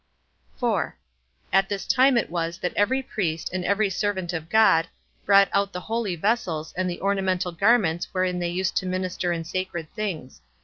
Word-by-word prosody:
4. - - -1 0.6
At 195 0 +4
this 200 -1 -3
time 260 0 +4
it 235 - 0
was 170 -1 -2
that 180 - -3
every 260 +6 +2
priest, 170 -10 -3
and 185 -1 -2
every 200 +1 +1
servant 190 -3 -2
of 165 -1 -5
God, 175 -7 +5 0.4
brought 200 0 +7
out 200 0 +1
the 180 - -3
holy 220 -3 -2
vessels, 170 -5 -1
and 185 +1 -1
the 175 - -5
ornamental 190 -2 0
garments 180 -2 +2
wherein 185 -1 0
they 175 -1 -1
used 185 +2 -1
to 185 - 0
minister 185 -1 -2
in 165 -1 -2
sacred 170 -2 -4
things. 190 - -5
185 Hz, 175 wpm, -25 LUFS, 175-200 Hz, 0.6 s, brought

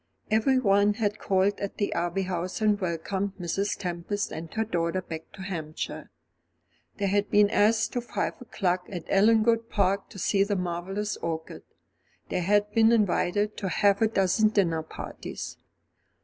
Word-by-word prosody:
Everyone 215 -3 +3
had 210 -2 -1
called 195 +1 +1
at 200 - -5
the 205 - -1
Abbey 175 +3 -1
House 180 +1 -3
and 210 -1 +2
welcomed 190 +3 -2
Mrs. 195 +4 -1
Tempest 185 +2 -3
and 160 +1 -7
her 220 - +1
daughter 170 -2 -1
back 160 -3 -8
to 190 - -9
Hampshire. 160 -5 -5 0.9
They 205 - -1
had 205 +1 +1
been 205 0 +4
asked 220 +1 +3
to 245 - -1
five 240 - -2
o'clock 185 -7 -1
at 175 -4 -6
Ellangowan 225 +3 +4
Park, 200 -1 +1
to 200 - -12
see 195 +1 +2
the 205 0 -1
marvellous 185 +3 -3
orchid. 160 -1 -5 0.7
They - - -1
had 205 +3 +2
been 225 0 +5
invited 210 -1 +1
to 195 - -2
half 200 +2 +3
a 220 - +5
dozen 210 +1 +2
dinner 175 -7 +1
parties. 160 - -7
200 Hz, 155 wpm, -27 LUFS, 180-210 Hz, 0.9 s, been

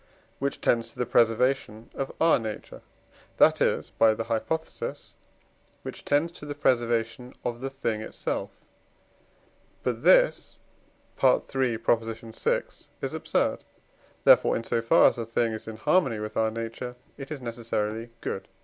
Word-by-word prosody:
which 140 +1 -2
tends 115 -1 +1
to - - -18
the 125 - 0
preservation 115 -1 +1
of 135 - -4
our 165 -4 +5
nature, 110 -2 -7 0.6
that - - +5
is - - +1
(by 110 -1 +4
the 115 - -3
hypothesis), 115 +8 -3 0.7
which - - -8
tends 150 +4 +1
to 170 - -12
the 145 -1 -5
preservation 120 -2 0
of 120 0 -3
the 135 - -2
thing 115 -5 -2
itself; - - -3 1.3
but - - -1
this - - +4 0.7
(III. 130 - +2
vi.) 115 0 0 0.4
is - - -3
absurd; - - 0 0.6
therefore, - - +6
in 115 - -2
so 115 0 0
far 115 - +6
as - - 0
a 115 - -2
thing 115 0 +1
is 110 - -7
in 110 -1 -6
harmony 115 +1 +2
with 105 0 -6
our 110 0 +2
nature, 115 +2 -5 0.2
it 135 - -7
is 155 -2 -5
necessarily 115 -2 -3
good. 95 - -4
115 Hz, 145 wpm, -27 LUFS, 115-135 Hz, 1.3 s, therefore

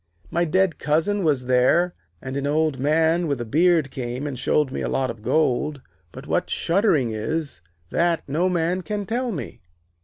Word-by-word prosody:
My 170 +1 +1
dead 185 +1 +1
cousin 170 +7 +1
was 140 -6 +1
there, 130 +8 +3 0.3
and 130 0 -5
an 140 0 -1
Old 155 -2 +1
Man 160 +4 +2
with 140 -4 -1
a 120 - -3
beard 160 +2 +2
came 125 +1 -4
and 135 -4 -4
showed 135 +1 +1
me - - -4
a - - -2
lot 130 -2 0
of 115 -2 -12
gold. 140 +3 +1 0.3
But - - -10
what - - -1
shuddering 165 - +2
is, 135 - -3 0.3
that 170 -1 +1
no 165 +6 +1
man 175 +1 0
can 205 +1 -4
tell 240 +4 -1
me.' 135 - -6
155 Hz, 180 wpm, -23 LUFS, 130-175 Hz, 0.3 s, there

